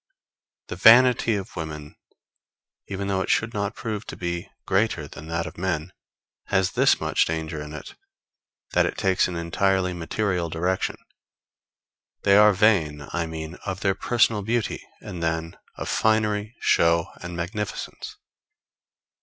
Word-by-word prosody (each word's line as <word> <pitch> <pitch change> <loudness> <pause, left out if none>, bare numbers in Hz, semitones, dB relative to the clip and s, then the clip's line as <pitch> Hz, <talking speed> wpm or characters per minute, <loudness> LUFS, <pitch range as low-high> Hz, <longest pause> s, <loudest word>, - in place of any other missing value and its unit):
The - - -4
vanity 120 +3 +6
of 95 -2 -6
women, 75 -3 -6 0.9
even 100 0 -4
though 95 -1 0
it - - -3
should 110 +1 +1
not 100 +1 -2
prove 110 -3 -4
to - - -7
be 85 +2 -4 0.2
greater 95 -6 +1
than 75 +2 -11
that 85 0 -2
of - - -9
men, 90 -2 -2 0.5
has 95 -2 +1
this - - +3
much - - +2
danger 80 -1 -3
in 75 0 -8
it, 75 - -8 0.8
that - - +3
it - - -5
takes 95 -3 +2
an 90 - -5
entirely 90 +2 +1
material 90 0 -1
direction. 90 +4 -1 1.3
They 100 -1 +5
are 105 +1 +8
vain, 80 -8 +2
I 85 -1 -1
mean, 80 +1 -6
of 95 0 -4
their 100 -2 +2
personal 115 +1 +2
beauty, 115 +2 -1 0.2
and 85 - -7
then 80 0 -2 0.2
of - - -6
finery, 110 0 +1
show 85 0 +3 0.2
and 85 0 -6
magnificence. 100 +4 -5
95 Hz, 145 wpm, -24 LUFS, 85-105 Hz, 1.3 s, are